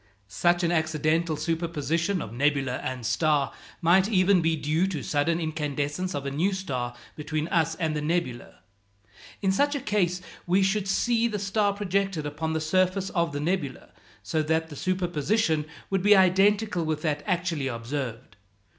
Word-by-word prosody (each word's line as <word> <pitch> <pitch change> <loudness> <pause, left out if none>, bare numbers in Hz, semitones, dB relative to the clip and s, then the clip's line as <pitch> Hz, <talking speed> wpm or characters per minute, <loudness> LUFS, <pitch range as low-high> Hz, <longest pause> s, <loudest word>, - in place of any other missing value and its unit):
Such 175 - +1
an 170 - +2
accidental 160 0 +1
superposition 165 +2 -1
of 110 - -9
nebula 135 -1 +1
and 130 -2 -5
star 150 +2 +1 0.3
might 185 +4 +4
even 185 -3 +4
be 165 0 +2
due 155 +4 0
to 165 -8 -4
sudden 155 +3 +1
incandescence 150 +1 -2
of 140 -1 -4
a 140 - -2
new 175 +8 +1
star 130 -10 -3 0.2
between 155 +1 -3
us 165 -1 +1
and 160 -2 -1
the 150 - -1
nebula. 150 -6 -3 0.8
In 190 - +3
such 285 +9 +2
a - - -1
case 190 -6 0 0.3
we 185 +3 +3
should 195 +1 +1
see 230 +4 +2
the 215 -3 -3
star 205 +1 +1
projected 195 -4 -1
upon 155 +2 -3
the 160 - 0
surface 185 +4 +1
of 170 -3 0
the 145 - -3
nebula, 150 -4 -2 0.3
so 160 - 0
that 160 +1 0
the 145 - -9
superposition 175 0 0 0.3
would 195 -1 +1
be 205 +2 +6
identical 195 0 +3
with 155 -1 -2
that 150 -2 0
actually 170 -6 0
observed. 120 -2 -5
165 Hz, 165 wpm, -26 LUFS, 150-190 Hz, 0.8 s, be